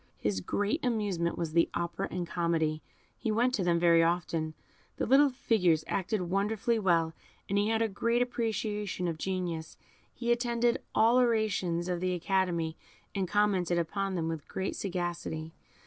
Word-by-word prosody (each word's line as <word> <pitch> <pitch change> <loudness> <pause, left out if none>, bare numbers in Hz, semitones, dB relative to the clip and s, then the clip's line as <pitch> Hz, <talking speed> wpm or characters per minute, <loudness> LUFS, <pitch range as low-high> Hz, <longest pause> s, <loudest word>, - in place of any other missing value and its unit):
His 100 -3 -1
great 205 - -1
amusement 205 -8 0
was 165 -2 -3
the 170 0 +4
opera 170 0 -2
and 180 -1 -3
comedy; 165 -3 0 0.4
he 225 - -1
went 240 +4 +2
to 200 - 0
them 175 -1 +3
very 170 -1 +5
often: 165 -2 0 0.4
the - - 0
little 275 +4 +6
figures 180 - +2
acted 195 +1 -1
wonderfully 210 +5 0
well, 165 -5 +2 0.3
and 200 +1 +1
as - - +4
he 210 - +1
had 225 0 +2
a - - +2
great 230 +3 0
appreciation 210 -6 -2
of 165 -2 -3
genius, 175 -4 -3 0.3
he 240 -1 -2
attended 240 0 +1
all 230 +3 +5
orations 210 -8 +1
of 180 -1 -1
the 185 0 0
Academy, 175 -3 0 0.4
and 195 -2 -1
commented 190 -4 +2
upon 195 +3 -1
them 165 -2 -1
with 160 -3 -4
great 190 - -3
sagacity. 175 -4 -3
185 Hz, 165 wpm, -30 LUFS, 170-220 Hz, 0.4 s, little